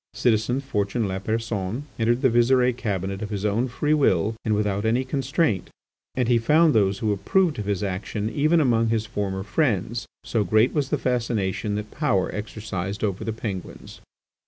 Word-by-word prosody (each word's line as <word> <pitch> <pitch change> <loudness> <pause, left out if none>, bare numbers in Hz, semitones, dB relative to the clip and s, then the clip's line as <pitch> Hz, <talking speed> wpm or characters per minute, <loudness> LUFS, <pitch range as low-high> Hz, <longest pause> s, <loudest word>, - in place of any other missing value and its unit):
Citizen 120 +2 +1
Fortuné 110 -4 -1
Lapersonne 105 +3 -2 0.2
entered 120 +2 +1
the 130 - +6
Visire 125 +1 +3
cabinet 100 -4 -3
of 105 - -4
his 105 -1 -3
own 110 +5 +1
free 150 +5 0
will 110 - +2
and 110 -1 +1
without 105 -1 0
any 115 +4 +2
constraint; 135 - 0 0.5
and 125 -2 +1
he 120 -1 +4
found 155 +7 +4
those 100 -3 +2
who 105 +1 0
approved 155 - +1
of 105 - -3
his 100 -1 -1
action 100 +2 -3
even 155 +8 +2
among 115 -6 +3
his 110 -1 0
former 95 -3 -3
friends, 115 - -1 0.2
so 110 -3 0
great 110 +6 +3
was 145 -4 0
the 150 - +1
fascination 115 -6 -1
that 105 0 -5
power 150 - 0
exercised 100 -1 -5
over 100 -3 -1
the 115 - -2
Penguins! 105 -4 -7
110 Hz, 170 wpm, -24 LUFS, 100-125 Hz, 0.5 s, the